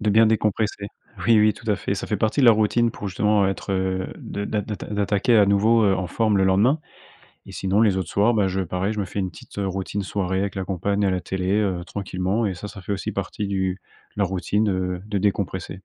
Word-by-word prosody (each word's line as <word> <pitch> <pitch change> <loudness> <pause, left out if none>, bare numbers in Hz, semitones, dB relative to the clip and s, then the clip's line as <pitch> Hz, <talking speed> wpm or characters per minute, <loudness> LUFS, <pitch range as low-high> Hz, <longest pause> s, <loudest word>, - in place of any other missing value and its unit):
De 105 -1 +1
bien 110 +2 +6
décompresser. 105 -1 0 0.4
Oui, 115 -2 +6
oui, 105 0 +5
tout 110 - -5
à 105 - +2
fait. - - -2
Ca - - -5
fait - - -1
partie 110 +6 0
de - - +5
la - - +10
routine 110 +2 +2
pour 105 - -6
justement 105 +1 +2
être, 95 0 -3
heu, 95 0 -1
de 100 - -5
d'a 105 0 -1
d'atta 105 0 -6
d'attaquer, 105 +2 +2
à 100 -2 +6
nouveau, 110 +3 +4
heu, 95 - +4
en 90 - -2
forme, 110 +1 +1
le 95 - +3
lendemain. 105 +11 +3 0.7
Et - - -11
sinon 95 +3 +1
les 105 -4 +4
autres 95 - -3
soirs, 105 +4 +3
bah, 105 -3 +2
je 95 +1 -2
pareil, 90 +3 -2
je 105 - -4
me 100 - -1
fais 100 - -5
une 95 -2 -2
petite, - - -14
heu, 100 - -1
routine 95 +1 -3
soirée 95 -1 -1
avec 100 -2 -3
la 95 -1 -3
compagne 100 +2 -1
à - - +3
la 90 -1 -1
télé, 95 0 -2
heu, 95 -4 -1
tranquillement 95 +3 -2
et 100 - -1
ça, 90 +4 -7
ça 100 -1 -10
fait 95 - -6
aussi 100 -2 -2
partie 105 - -3
du 95 -1 -1 0.4
de 105 - 0
la - - +4
routine, 95 +3 0
heu, 90 -1 -2
de 105 -1 -1
décompresser. 95 -2 -2
100 Hz, 250 wpm, -23 LUFS, 95-105 Hz, 0.7 s, la